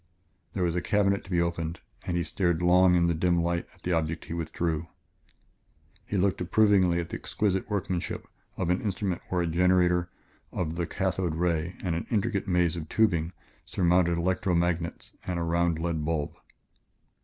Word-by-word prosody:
There 90 - -1
was 85 -1 +1
a 90 - 0
cabinet 100 0 +1
to - - -14
be 90 -2 +1
opened, 85 -1 -1 0.3
and 85 - 0
he 85 - +1
stared 85 0 0
long 90 +1 +5
in 85 -1 +4
the 85 - +2
dim 85 +1 +2
light 85 0 -1
at - - -25
the 90 - -1
object 80 0 -1
he - - -6
withdrew. 85 0 -2 1.2
He 100 - -1
looked 95 0 +1
approvingly 95 -2 +4
at 85 - -4
the - - -4
exquisite 95 -2 -1
workmanship 95 -4 -2 0.3
of 90 -2 0
an 90 - +1
instrument 95 -3 -2
where 90 -1 +1
a - - 0
generator 90 +1 +3 0.4
of 80 -3 -2
the 85 0 -2
cathode 95 -3 -1
ray 85 0 0
and 90 -3 0
an 85 - -4
intricate 105 -2 0
maze 90 -3 +2
of 80 -2 -6
tubing 85 -7 +2 0.3
surmounted 85 -1 +2
electro 90 +1 +1
magnets 85 0 -1 0.2
and 90 -1 -1
a 85 - -1
round 85 0 +1
lead 80 -1 -2
bulb. 75 -2 -2
85 Hz, 180 wpm, -28 LUFS, 85-95 Hz, 1.2 s, long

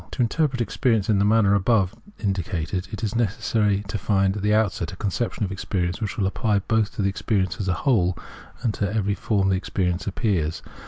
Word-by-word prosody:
I - - -14
To 125 - +1
interpret 130 +1 0
experience 115 -3 +1
in 100 - +3
the 100 - +3
manner 105 -2 +4
above 100 -2 +2 0.2
in 100 -3 0
dicated, 90 0 -3
it 110 +2 -6
is 110 - -1
necessary 105 -2 +1
to 105 +1 -3
find 95 0 +2
at 105 - -4
the 105 +1 +1
outset 100 -6 +1
a - - -8
conception 105 +3 -2
of 95 - -2
experience 90 0 -2
which 105 - -3
will 100 - +1
apply 105 +2 +1
both 110 +1 0
to 105 - -1
experience 95 -1 0
as 100 - -2
a 90 - +2
whole 90 -10 +3 0.5
and 115 -4 +1
to 100 -1 -1
every 100 -2 0
form 100 +1 0
in 95 - +2
which 95 - +2
experience 90 -2 -2
appears. 90 -6 -1
100 Hz, 215 wpm, -24 LUFS, 95-110 Hz, 0.5 s, manner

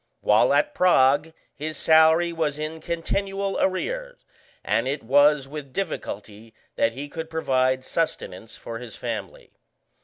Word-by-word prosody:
While - - +4
at 295 0 +2
Prague 150 - +3 0.2
his 155 +2 -5
salary 160 +2 +4
was 155 -3 -1
in 155 +1 -5
continual 195 +4 -2
arrear, - - -2 0.5
and - - +1
it 140 +2 -3
was 145 +3 +4
with 140 -2 -8
difficulty 110 - -5 0.2
that 115 - +1
he 140 +4 -6
could 160 +2 -7
provide 130 -5 0
sustenance 115 - -3
for 115 -1 -7
his 120 -3 -9
family. - - -6
155 Hz, 130 wpm, -24 LUFS, 130-170 Hz, 0.5 s, While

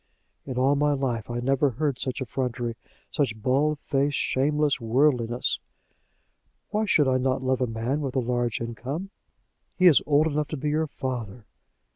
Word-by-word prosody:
"In 130 -2 -4
all 135 +3 +3
my 145 +1 +2
life 125 -6 -2
I 120 0 -2
never 135 +3 +2
heard 135 +1 -2
such 130 +1 -3
effrontery, 120 -2 -3 0.4
such 120 -7 -1
barefaced, 140 +2 +1
shameless 145 +1 +1
worldliness!" 120 0 +1 1.1
"Why 215 +1 0
should 150 -8 +3
I 130 0 +2
not 130 0 0
love 130 0 +1
a 125 - +2
man 115 +6 -2
with 135 -2 -3
a - - +3
large 120 -1 -1
income?" 130 - -5 0.7
"He 185 - +3
is 170 -6 +7
old 150 +1 +4
enough 150 -1 0
to 155 - -4
be 150 +2 -2
your 155 +1 +1
father." 125 -5 -5
130 Hz, 160 wpm, -26 LUFS, 120-145 Hz, 1.1 s, is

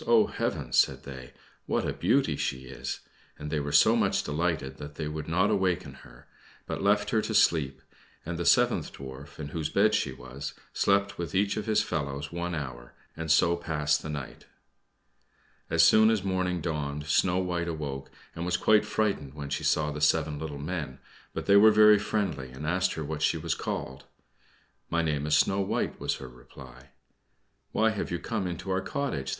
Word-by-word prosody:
oh, 115 -2 +6
heavens!" - - -1
said - - +2
they; 65 -2 -9 0.4
"what - - 0
a - - -1
beauty - - +2
she 65 - -2
is!" 65 - -6 0.4
and 75 0 -6
they 75 - 0
were 75 0 -3
so - - +6
much - - +1
delighted 75 -3 -2
that 75 0 -9
they 75 0 -4
would 75 0 -5
not 90 +6 +2
awaken 95 -4 0
her, - - -16 0.4
but - - -4
left 105 +1 +2
her 110 - +3
to 110 - -3
sleep, 70 -9 +2 0.4
and 85 +1 -3
the - - -1
seventh - - +3
Dwarf, 65 +1 -10
in 75 -2 -5
whose 80 0 -3
bed 105 +4 +3
she 70 - +1
was, 65 +2 -8 0.2
slept 100 0 +1
with 85 -2 -4
each 100 +1 +2
of 105 -1 -4
his 110 - +3
fellows 70 -1 -3
one 85 0 -3
hour, 65 -5 -7 0.2
and 80 0 -5
so 85 +2 +4
passed 75 -3 0
the - - -7
night. 75 -3 -7 1.2
As - - +4
soon 110 0 +6
as 110 -3 +1
morning 90 -2 -1
dawned 75 -3 -3
Snow 90 +4 +2
White 90 -2 -1
awoke, 70 -5 -5 0.3
and 85 - -4
was 90 0 0
quite 105 -1 +4
frightened 85 -11 -1
when 70 -2 -6
she 70 - -2
saw 75 -1 +1
the 75 0 -6
seven 75 0 +2
little 75 -2 -5
men; 75 -3 -4 0.3
but - - -5
they 100 - +6
were 110 +2 +8
very 105 -1 +7
friendly, 95 -11 -2
and 65 +4 -8
asked 90 +4 +1
her 80 - -4
what 75 +1 -5
she 80 - +2
was 80 +1 -1
called. 65 0 -5 0.8
"My 85 0 +1
name 75 -2 -1
is 75 0 +4
Snow 95 - +2
White," 95 - -2
was - - -1
her 65 - -9
reply. 65 +1 -14 0.8
"Why 110 0 +3
have 105 - -3
you 85 - -1
come 90 +3 -3
into 90 +2 -5
our 95 0 +1
cottage?" 95 - -3
80 Hz, 190 wpm, -28 LUFS, 70-95 Hz, 1.2 s, were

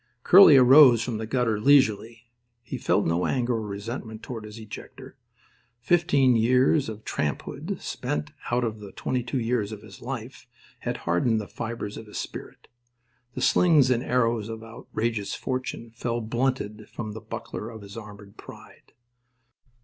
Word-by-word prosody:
Curly 180 -6 +9
arose 130 -2 +7
from 115 -2 -3
the 110 - -4
gutter 115 -3 0
leisurely. 115 -3 +2 0.3
He - - -6
felt - - +1
no 85 +2 +1
anger 125 -2 0
or 115 - -1
resentment 110 +2 -6
toward 115 -4 -7
his 105 +1 -10
ejector. 110 -2 -10 0.6
Fifteen 140 -3 +3
years 125 +4 +3
of 110 0 -9
tramphood 75 -2 -3
spent 75 0 -4 0.2
out 125 +1 +1
of 110 -2 -3
the 100 -2 -11
twenty 130 -1 -2
two 125 +2 -3
years 115 -3 -1
of 105 -1 -8
his 100 -3 -13
life 125 0 -7 0.3
had - - -3
hardened 90 +7 +2
the 105 - -6
fibres 115 -3 -6
of 110 - -9
his 105 - -8
spirit. - - -8 0.7
The 130 - -4
slings 150 -3 +4
and 120 -1 +2
arrows 115 -4 0
of 110 0 -7
outrageous 115 -2 -4
fortune 130 -3 -4
fell 115 +1 -3
blunted 115 -2 -2
from 110 -2 -5
the 110 +1 -8
buckler 110 - -7
of 110 -3 -10
his 100 0 -11
armoured 105 -2 -11
pride. - - -14
115 Hz, 155 wpm, -26 LUFS, 110-125 Hz, 0.7 s, Curly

